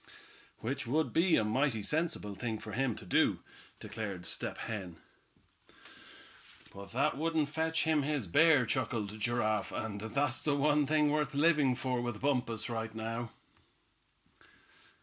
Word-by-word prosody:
"Which 130 +2 -3
would 155 +6 0
be 170 +1 +4
a - - +3
mighty 110 0 +1
sensible 155 -6 -1
thing 110 +2 -3
for 110 0 -9
him 125 0 0
to - - -11
do," 90 - +2 0.4
declared 100 -5 -5
Step - - -2
Hen. 95 -7 -5 1.8
"But 100 0 -10
that 135 +2 +1
wouldn't 160 -2 +1
fetch 160 +1 0
him 160 -2 +2
his 145 -4 -1
bear," 145 - +5
chuckled 110 -4 -2
Giraffe, 110 -1 0
"and 105 -2 -4
that's 130 +4 0
the 145 -2 +2
one 145 0 +3
thing 150 0 +3
worth 150 -1 0
living 145 -4 +4
for 125 -1 -1
with 120 -3 -4
Bumpus 125 -5 0
right 115 -1 -4
now." 115 +1 -4
125 Hz, 140 wpm, -32 LUFS, 110-150 Hz, 1.8 s, bear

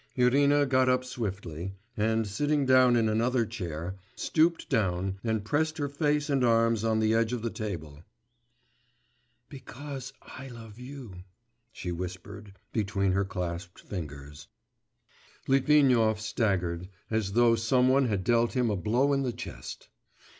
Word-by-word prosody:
Irina 140 +3 +4
got 130 -1 +3
up 125 0 +2
swiftly, 95 -7 -5 0.2
and, 110 0 +1
sitting 145 +8 0
down 130 -1 +5
in 115 -2 +3
another 115 +2 +1
chair, 90 -4 -5 0.2
stooped 165 +1 +1
down 95 -2 0
and 110 -3 -1
pressed 155 +6 0
her 145 -2 -1
face 145 +1 0
and 140 -3 +1
arms 115 -2 +3
on 110 -1 +2
the 110 0 +2
edge 115 +1 +1
of 120 -2 -3
the 115 - -2
table. 80 -8 -6 1.4
'Because 135 -1 -8
I 135 +1 -10
love 115 -3 -11
you 125 -6 -9 0.3
...' 120 0 -48
she 90 - -5
whispered 90 +3 -7 0.2
between 100 -3 0
her 100 +1 +1
clasped 90 -1 -5
fingers. 75 -5 -8 1.0
Litvinov 130 -5 +4
staggered, 95 -6 -1 0.2
as 110 -3 -1
though 120 +1 +5
some 120 +3 +2
one 135 0 +4
had 100 -4 -1
dealt 115 +2 +2
him 125 -4 +1
a - - 0
blow 120 +9 +1
in 135 - +1
the 130 -2 -1
chest. 60 - -8
115 Hz, 145 wpm, -28 LUFS, 95-130 Hz, 1.4 s, down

